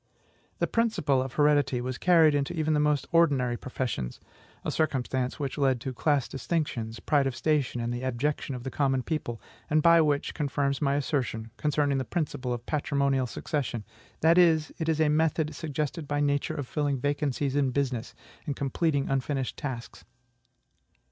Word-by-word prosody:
The - - +1
principle 215 - +1
of 130 -1 -5
heredity 145 -4 +3
was 125 +1 -4
carried 165 -4 +5
into 145 +4 -1
even 155 -1 +1
the 150 - +2
most 150 -1 +2
ordinary 140 -8 +3
professions, 120 - -4 0.5
a - - 0
circumstance 130 -4 -1
which 140 0 -3
led 135 -3 +2
to 130 0 -4
class 140 0 +1
distinctions, 135 -7 -3
pride 145 -3 +2
of 130 - -3
station, 145 -5 0
and 120 +1 -2
abjection 130 +3 -2
of 125 - -7
the 130 - -4
common 135 -3 +1
people, 120 -8 -3 0.3
and 155 0 +3 0.2
which 145 -1 0
confirms 140 -2 -1
my 140 -1 +2
assertion, 125 -6 -2
concerning 145 -2 +1
the - - -1
principle 145 -3 -3
of 120 -1 -4
patrimonial 140 -3 0
succession, 120 -3 -3 0.4
that 165 +3 +5
it 160 -2 +3
is 160 -1 +1
a 155 - +4
method 155 0 +1
suggested 150 0 -3
by 145 0 -1
Nature 145 -1 0
of 145 - -3
filling 145 -2 -1
vacancies 145 0 -1
in 140 -2 +2
business, 130 -2 -2 0.3
and 145 - -1
completing 140 +1 0
unfinished 135 -1 -1
tasks. 125 -5 -6
140 Hz, 160 wpm, -28 LUFS, 130-150 Hz, 0.5 s, carried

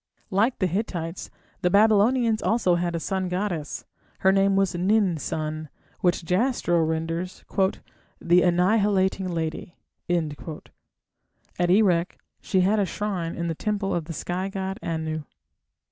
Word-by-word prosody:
Like 220 +7 +2
the 190 - +1
Hittites, 180 -2 -3 0.3
the 180 - +2
Babylonians 220 +3 +4
had - - 0
also 215 -6 +3
a 170 -1 -1
sun 190 +2 -2
goddess: 180 -5 -3 0.4
her 190 - +5
name 195 0 +3
was 195 -1 +2
Nin 185 0 +2
sun, 155 +1 -4 0.3
which 175 -1 +1
Jastrow 180 -2 +1
renders 165 +3 -3 0.7
"the 175 +1 +4
annihilating 190 +1 +2
lady". 170 +2 -4 0.3
At 165 +1 -5
Erech 180 -3 +3 0.2
she 190 - +1
had 205 +4 +3
a 200 - +2
shrine 185 -5 -3
in 170 - -3
the 165 - -1
temple 205 +3 -2
of 170 -3 -1
the 165 - -6
sky 180 +4 -3
god 195 +1 -4
Anu. 160 -1 -3
180 Hz, 130 wpm, -25 LUFS, 170-200 Hz, 0.7 s, her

